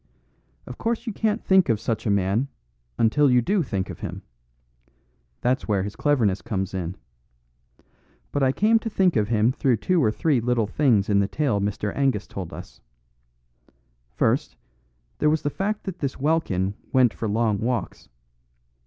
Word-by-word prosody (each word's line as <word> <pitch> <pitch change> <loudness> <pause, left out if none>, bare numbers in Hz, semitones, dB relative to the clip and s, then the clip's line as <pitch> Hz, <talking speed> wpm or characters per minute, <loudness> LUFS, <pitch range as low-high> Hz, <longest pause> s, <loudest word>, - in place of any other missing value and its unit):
"Of 125 - -9
course 230 +1 -2
you 225 - -3
can't 220 +2 -1
think 190 -5 +4
of 110 -3 +2
such 110 0 -2
a - - +2
man, 100 +6 +1 0.5
until 140 +6 +3
you 125 -1 +5
do 195 - +1
think 100 - -2
of - - -8
him. - - -6 1.2
That's 125 +2 0
where 100 -3 +1
his 100 +1 -5
cleverness 115 -10 +1
comes 95 -5 -3
in. 90 -1 -4 1.3
But 145 - -1
I 130 -1 +4
came 220 +9 +3
to 225 - -4
think 190 -6 +2
of 105 -3 +2
him 110 +1 +2
through 130 -2 +1
two 175 - +1
or 110 - +4
three 135 +3 +1
little 120 -1 +1
things 105 -2 +2
in 100 -1 +3
the 100 - +2
tale 125 -6 0
Mr. 105 +1 -2
Angus 135 -7 +1
told 95 -4 -7
us. - - -11 1.3
First, - - 0 0.6
there 150 - +3
was 155 0 0
the 145 - -1
fact 210 +5 -2
that 185 -2 -6
this 140 -3 -3
Welkin 130 - 0 0.2
went 125 -3 +4
for 110 - -4
long 110 -1 +1
walks. 120 +2 -3
120 Hz, 170 wpm, -24 LUFS, 105-150 Hz, 1.3 s, you